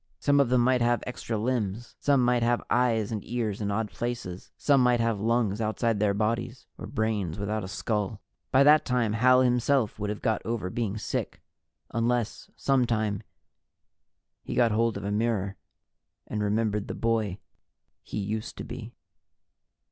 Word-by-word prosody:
Some 145 0 +3
of 140 -4 +3
them 125 -1 +4
might 125 0 +3
have 120 0 +2
extra 120 -2 -4
limbs. 115 -1 -2
Some 140 -3 +3
might 125 -1 +3
have 120 +1 +1
eyes 115 -4 +2
and 105 -3 -3
ears 110 -4 -2
in 100 - -1
odd 105 +1 -1
places. 120 -7 -5
Some 140 -2 +4
might 125 -1 +4
have 115 -2 +1
lungs 115 -2 +1
outside 110 0 0
their 100 -1 +2
bodies, 115 +4 -2
or - - -6
brains 110 - -1
without 105 +1 -2
a - - -5
skull. 105 +1 -2 0.3
By 135 +1 +6
that 150 +2 +6
time, 120 -4 0
Hal 125 +3 +5
himself 125 -2 +2
would 105 0 -2
have 105 - -5
got 110 - +1
over 110 -5 -3
being 110 -2 -2
sick 110 - -3 0.5
unless, 115 -1 -1
some 135 -3 +2
time, 110 -3 0 1.2
he - - -5
got 120 -2 +4
hold 115 +1 +1
of - - -6
a 100 - -2
mirror 105 -2 0 0.7
and 105 - -3
remembered 105 0 0
the - - -4
boy 110 -5 0 0.6
he - - -7
used 105 +2 -3
to - - -5
be. - - -8
115 Hz, 170 wpm, -27 LUFS, 105-120 Hz, 1.2 s, By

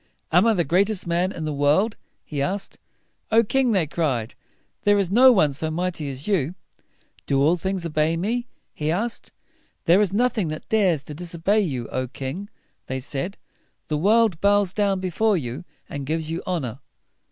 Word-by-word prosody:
"Am 180 +7 +5
I 225 - +5
the 175 - +2
greatest 190 +6 +1
man 175 +2 0
in 165 -5 -5
the 155 - -2
world?" 150 +10 +2 0.3
he 145 -2 -4
asked. 195 +6 -3 0.5
"O 225 +1 +6
king!" 255 +2 +1
they 190 -6 +2
cried, 135 -8 -1 0.5
"there 205 0 +4
is 195 -3 0
no 255 +5 +8
one 155 - +3
so 155 +3 -2
mighty 170 -2 -2
as 135 +2 -7
you." 180 -5 0 0.7
"Do 135 - +2
all 155 +5 +4
things 190 0 -3
obey 155 0 +1
me?" 235 +7 -1 0.3
he 150 0 -2
asked. 220 +8 -2 0.5
"There 175 +5 +5
is 200 -3 +1
nothing 220 -3 +1
that 155 0 -6
dares 185 -9 +2
to 150 - -8
dis 170 +2 -7
o - - -6
bey 200 +6 +2
you, 135 - -2
O 130 0 -2
king!" 140 +10 -6 0.4
they 130 0 -3
said. 140 +8 -4 0.5
"The 150 - 0
world 210 -1 +3
bows 200 -2 +3 0.3
before 190 +3 +1
you, 125 +1 -5 0.2
and 145 -3 -5
gives 160 +1 -1
you 165 - -3
honor." 140 -9 -2
175 Hz, 180 wpm, -23 LUFS, 150-200 Hz, 0.7 s, no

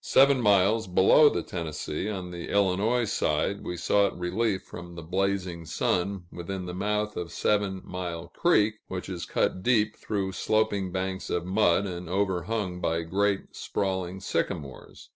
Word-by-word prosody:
Seven 135 -1 +5
miles 105 +1 +4
below 95 +11 +6
the 85 - -2
Tennessee, 80 +2 -4
on 95 -4 -5
the 85 -1 -6
Illinois 100 +5 +2
side, 100 0 0
we 90 - -4
sought 100 +3 +2
relief 95 +3 -1
from 85 0 -10
the 85 - -7
blazing 95 -1 -1
sun 90 +3 -1
within 90 +2 -5
the 90 - -5
mouth 105 +3 -1
of 85 -1 -4
Seven 100 0 0
Mile 90 -2 -5
Creek, 110 -11 +2
which 90 -1 -5
is 90 -3 -5
cut 90 - 0
deep 110 -1 +2
through 100 -3 -2
sloping 100 -2 0
banks 95 0 -3
of 85 0 -1
mud, 95 0 +3
and 90 -3 -5
overhung 95 0 -1
by 80 0 0
great 100 +4 -1
sprawling 95 -1 -2
sycamores. 85 -7 -4
95 Hz, 150 wpm, -27 LUFS, 90-105 Hz, -, below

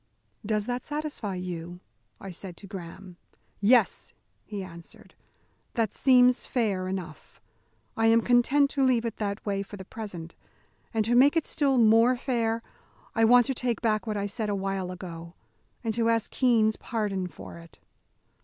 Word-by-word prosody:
"Does 210 -1 -1
that 245 +1 -3
satisfy 295 -10 -4
you?" 175 -1 -6 0.4
I 195 - -8
said 175 0 -9
to - - -12
Graham. 185 -1 -9 0.4
"Yes," 225 +1 +2 0.3
he 205 -2 -6
answered, 170 -2 -12 0.6
"that 225 -4 0
seems 250 -1 +4
fair 200 -7 0
enough. 185 -5 -7 0.6
I 225 0 +2
am 225 +1 +5
content 265 +4 +3
to 275 - +1
leave 245 -3 +2
it 230 - -2
in 210 - +1
that 200 +1 -5
way 200 -1 -1
for 200 +1 -8
the 190 - -9
present. 185 -7 -8 0.6
And 220 -2 0
to 235 - +1
make 280 +6 +5
it 325 - +1
still 275 -4 +1
more 230 +2 +5
fair, 230 -3 -1 0.5
I 225 -1 +3
want 245 +1 +6
to 270 - -1
take 240 -3 -2
back 220 -1 0
what 210 -1 -2
I 200 - -1
said 210 +1 -3
awhile 195 -2 -2
ago, 170 -2 -8 0.5
and 225 -2 -1
to 230 +1 +1
ask 230 -2 0
Keene's 225 -4 +3
pardon 205 -5 -2
for 170 - -11
it." 165 -1 -15
215 Hz, 165 wpm, -27 LUFS, 190-240 Hz, 0.6 s, want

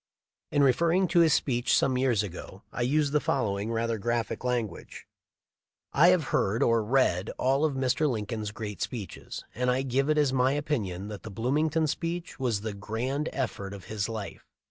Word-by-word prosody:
In 145 - +3
referring 170 +8 +3
to 175 - +4
this 165 -2 +5
speech 120 -3 +1
some 130 - +2
years 125 -5 +2
ago 95 +1 -8
I - - -4
used 145 +3 +1
the 150 - +4
following 110 -9 -1
rather 115 -1 -1
graphic 120 +3 -2
language: 120 -7 -3 0.9
"I 155 +5 +6
have 180 -3 +5
heard 105 +4 +2
or 115 -1 +3
read 105 -6 +2
all 135 +4 +2
of 150 -3 0
Mr. 135 +3 +1
Lincoln's 110 -2 -3
great 105 -1 -6
speeches, 105 -8 -5
and 125 +1 0
I 130 +2 +1
give 135 +2 0
it 155 - +3
as 145 -3 +3
my 130 +1 +3
opinion 105 -11 -2
that 105 -2 -7
the - - -8
Bloomington 150 - +1
speech 165 +2 -3
was 120 -6 0
the 110 -1 -4
grand 120 +9 -3
effort 100 -7 -3
of 95 - -12
this 105 0 -2
life. 110 -3 -6
125 Hz, 180 wpm, -28 LUFS, 105-145 Hz, 0.9 s, I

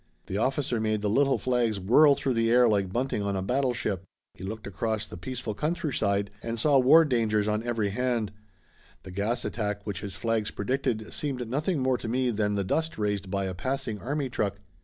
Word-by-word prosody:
The 95 - -3
officer 130 -1 0
made 110 -1 0
the 105 - +1
little 135 +4 +3
flags 120 -5 0
whirl 140 +10 +6
through 135 -1 -1
the 115 -1 +2
air 120 +1 +6
like 100 -4 +1
bunting 125 0 -1
on 100 -1 -1
a 95 - -1
battleship. 120 -5 0 0.3
He 90 - -12
looked 110 +2 -5
across 105 +3 -2
the - - -10
peaceful 115 +4 -5
countryside 115 - -1
and 115 0 -3
saw 140 +3 +4
war 155 +6 +7
dangers 110 -6 +1
on 105 0 +1
every 115 -4 -1
hand. 120 -2 0 0.7
The 95 - -9
gas 110 +6 -1
attack 105 -2 -3
which 100 -4 -4
his 100 -3 -6
flags 115 0 0
predicted 110 -1 -2
seemed 130 -5 -3
nothing 150 +8 0
more 130 -1 +1
to - - -6
me 125 +2 +1
than 105 -1 0
the 100 - 0
dust 160 - -1
raised 105 -2 -1
by 100 0 -1
a 95 - -3
passing 130 +1 -3
army 140 +3 -2
truck. 100 -5 -2
115 Hz, 200 wpm, -28 LUFS, 100-130 Hz, 0.7 s, war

